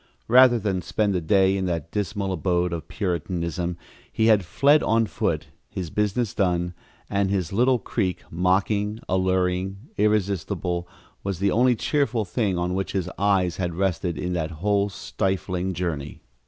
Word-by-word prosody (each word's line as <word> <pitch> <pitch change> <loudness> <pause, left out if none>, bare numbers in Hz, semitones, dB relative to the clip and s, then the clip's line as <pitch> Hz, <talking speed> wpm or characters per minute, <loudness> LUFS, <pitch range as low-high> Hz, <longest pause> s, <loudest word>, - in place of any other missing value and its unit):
Rather 125 0 +7
than 100 -4 -1
spend 100 +5 0
the 90 - 0
day 95 +3 +3
in 95 -1 -1
that 85 -2 -3
dismal 100 -1 -2
abode 90 -1 0
of 80 -3 -5
Puritanism 85 -2 -2 0.3
he 110 - +1
had 110 -3 +5
fled 140 - +4
on 115 +1 +2
foot, 85 -8 -2 0.2
his 90 -4 -5
business 105 +2 0
done, 90 -2 0 0.3
and 100 -1 0
this 95 -3 -1
little 125 +4 +3
creek, 95 -4 -2
mocking, 100 +5 +1
alluring, 95 0 0 0.2
irresistible, 95 -4 0 0.4
was 100 -2 -2
the 100 +3 +1
only 125 +2 +4
cheerful 125 -3 0
thing 95 -1 -1
on 90 +1 -1
which 95 +1 -2
his 90 -2 -2
eyes 95 -3 +2
had 90 -3 -2
rested 90 -2 -1
in 90 0 -2
that 80 -3 -1
whole 100 +5 0
stifling 95 +1 -2
journey. 80 -8 -4
95 Hz, 155 wpm, -24 LUFS, 90-105 Hz, 0.4 s, Rather